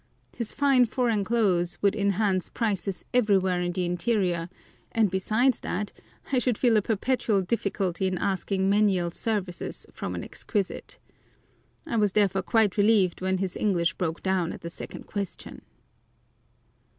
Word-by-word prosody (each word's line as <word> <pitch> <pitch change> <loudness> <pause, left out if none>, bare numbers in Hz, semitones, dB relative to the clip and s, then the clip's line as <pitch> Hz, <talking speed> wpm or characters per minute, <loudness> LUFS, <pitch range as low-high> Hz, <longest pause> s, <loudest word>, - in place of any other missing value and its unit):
His 235 -3 -1
fine 275 -3 +4
foreign 230 -3 0
clothes 190 -6 +1
would 200 0 +3
enhance 200 -2 +1
prices 200 -4 -2
everywhere 190 -6 +3
in 175 0 -1
the 180 0 -1
interior, 175 -1 0 0.4
and 220 -4 +2
besides 220 +7 +2
that, 205 +2 -3 0.4
I 260 - +3
should 245 -2 0
feel 240 -3 +3
a 215 - +4
perpetual 220 -1 0
difficulty 190 -3 -1
in 185 -1 -1
asking 190 +1 0
menial 195 -4 +2
services 195 -3 -3
from - - -4
an - - -4
exquisite. 205 -4 -4 0.9
I 230 - -2
was 205 -3 +2
therefore 195 -2 +2
quite 215 0 +2
relieved 205 -4 +3
when 190 0 0
his 185 -1 -2
English 170 -5 +1
broke 165 -1 -3
down 185 -3 0
at - - -10
the 170 - -6
second - - -8
question. 200 -3 -6
195 Hz, 145 wpm, -26 LUFS, 185-220 Hz, 0.9 s, fine